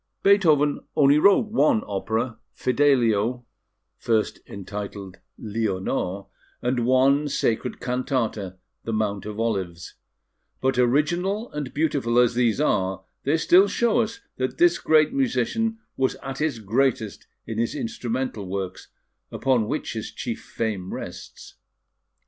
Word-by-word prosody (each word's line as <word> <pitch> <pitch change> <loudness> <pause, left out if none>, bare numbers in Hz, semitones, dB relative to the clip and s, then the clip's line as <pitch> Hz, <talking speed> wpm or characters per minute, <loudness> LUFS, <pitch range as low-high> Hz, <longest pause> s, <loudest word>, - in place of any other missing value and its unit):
Beethoven 155 -8 +4 0.2
only 145 0 +5
wrote 200 +5 +4
one 155 - +3
opera, 110 +4 -2 0.2
Fidelio 125 -3 +2 0.5
(first 110 -2 0
entitled 100 -1 -7 0.2
Leonore), 100 -3 -2 0.3
and 125 -1 0
one 135 +3 +4
sacred 125 -1 -1
cantata, 125 -7 -2 0.3
The 115 - -3
Mount 105 -2 -1
of 105 0 -6
Olives; 95 -7 -2 0.7
but, 130 -1 +1
original 175 - +1
and 150 -3 -5
beautiful 140 -6 0
as 125 -1 +5
these 120 0 +1
are, 95 -9 0 0.2
they 145 +4 +3
still 185 +4 +5
show 235 +3 +1
us 225 0 -2 0.2
that 130 0 -2
this 175 0 +4
great 155 - +3
musician 230 -4 0 0.2
was 130 0 +1
at 135 0 -5
his 150 -5 0
greatest 115 0 -1 0.2
in 110 -1 -4
his 115 - -1
instrumental 115 -3 -3
works, 95 -1 -5 0.4
upon 125 -5 +1
which - - -3
his - - -5
chief - - -5
fame 105 -5 -4
rests. - - -9
125 Hz, 125 wpm, -24 LUFS, 110-150 Hz, 0.7 s, only